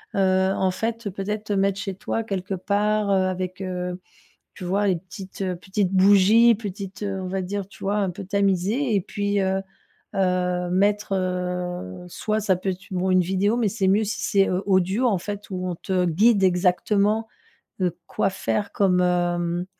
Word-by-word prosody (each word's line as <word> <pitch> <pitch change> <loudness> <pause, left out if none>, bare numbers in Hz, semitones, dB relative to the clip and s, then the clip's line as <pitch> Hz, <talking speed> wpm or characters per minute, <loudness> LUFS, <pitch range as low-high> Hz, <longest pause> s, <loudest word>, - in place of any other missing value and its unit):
heu, 190 -1 +3
en 190 - +1
fait, 225 +3 -3
peut-être 210 +2 -4
te 210 - -2
mettre 195 0 +1
chez 195 -2 -4
toi 225 +3 -3
quelque 195 -2 -4
part, 205 +2 0
heu, - - +3
avec, 185 0 -3
heu, 180 -1 -4 0.6
tu - - -8
vois, 200 +3 +1
les 185 - +2
petites 190 +2 -8 0.2
petites 190 0 -1
bougies, 205 +4 +6
petites, 200 -2 -7
heu, 195 -1 -3
on 185 - -4
va 190 0 -2
dire, 195 +1 -4
tu - - -12
vois, 200 +2 0
un 195 -3 0
peu 185 +2 -8
tamisé 200 +6 +1
et - - +2
puis, 205 +2 -1
heu 190 0 +1 0.6
heu, 180 -1 0
mettre, 200 +2 +1
heu, 180 - -3
soit 215 +4 -2
ça 195 -4 +2
peut 190 +2 -2
être 185 0 -5
bon, 185 0 0
une 185 - +5
vidéo, 195 +5 +1
mais 225 -4 +2
c'est 195 -1 -1
mieux 205 +3 +3
si 215 - -3
c'est, 195 -2 +2
heu, 185 +2 0
audio, 190 +5 +2
en 200 -6 +2
fait, 205 +2 -6
où 185 -1 -3
on 175 - -3
te 180 0 0
guide 200 +5 +3
exactement, 200 +4 +2 0.5
heu, 180 -3 0
quoi 195 - 0
faire 200 +1 -2
comme 185 -3 +2
hem, 175 0 0
190 Hz, 185 wpm, -24 LUFS, 180-205 Hz, 0.6 s, bougies